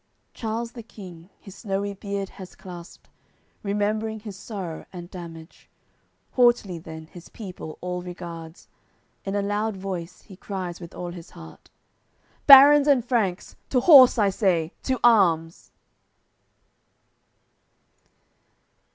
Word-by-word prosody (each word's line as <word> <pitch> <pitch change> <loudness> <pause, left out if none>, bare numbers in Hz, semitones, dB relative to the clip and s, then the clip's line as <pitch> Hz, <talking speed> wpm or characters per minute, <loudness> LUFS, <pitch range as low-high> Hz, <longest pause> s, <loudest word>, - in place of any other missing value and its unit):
Charles 230 0 -4
the 240 - -9
King 185 -6 -13
his 195 - -13
snowy 200 -1 -3
beard 200 0 -5
has 185 -2 -12
clasped, 175 -2 -12 0.5
Remembering 215 +2 -2
his 210 -3 -8
sorrow 195 -5 -7
and 175 -1 -10
damage, 165 -2 -11 0.6
Haughtily 240 -8 +2
then 160 -1 -10
his 170 +2 -14
people 185 -7 -9
all 180 0 -4
regards, 170 -2 -9 0.6
In 195 0 -3
a 200 - 0
loud 205 +1 -2
voice 185 -2 -6
he 195 - -14
cries 185 -2 -6
with 170 - -10
all 175 -1 -5
his 175 -1 -11
heart: 80 0 -14 0.8
"Barons 285 +1 +9
and 265 -5 +3
Franks, 210 -7 -1
to 255 - +2
horse, 265 -4 +8
I 205 -3 +3
say, 180 -5 0
to 260 -2 -2
arms!" 170 -8 +3
195 Hz, 120 wpm, -24 LUFS, 175-220 Hz, 0.8 s, Barons